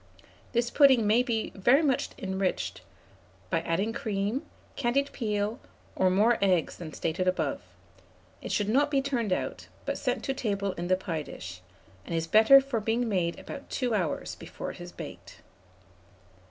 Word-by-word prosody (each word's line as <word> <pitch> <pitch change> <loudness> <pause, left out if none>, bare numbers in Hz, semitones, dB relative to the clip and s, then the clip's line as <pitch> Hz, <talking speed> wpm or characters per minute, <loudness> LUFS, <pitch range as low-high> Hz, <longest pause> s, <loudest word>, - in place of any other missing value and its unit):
This 235 0 +1
pudding 265 -6 +6
may 220 +4 +4
be 235 -3 -1
very 245 +10 +4
much 270 -4 +1
enriched 190 -1 -2 0.7
by 165 - +2
adding 190 +7 -1
cream, 210 +3 -2 0.3
candied 275 +2 +1
peel, 210 +1 -2 0.4
or 185 - +3
more 215 +5 +3
eggs 180 -4 +2
than 165 -3 -7
stated 165 +4 -2
above. 185 - 0 0.8
It - - -5
should 205 - +1
not 280 +7 +3
be 280 -2 +2
turned 240 -7 -1
out, 185 - -2 0.2
but - - -2
sent 250 -4 -1
to 270 - -1
table 200 -6 -1
in 175 -1 -5
the 185 0 +3
pie 165 -4 -3
dish, 90 -10 -9 0.4
and 170 - -4
is 165 0 0
better 220 +10 +8
for 270 -4 -2
being 225 +3 0
made 180 -5 0
about 280 - -9
2 250 -3 -1
hours 180 -7 -1
before - - -7
it - - -11
is - - -8
baked. - - -10
215 Hz, 165 wpm, -28 LUFS, 185-245 Hz, 0.8 s, better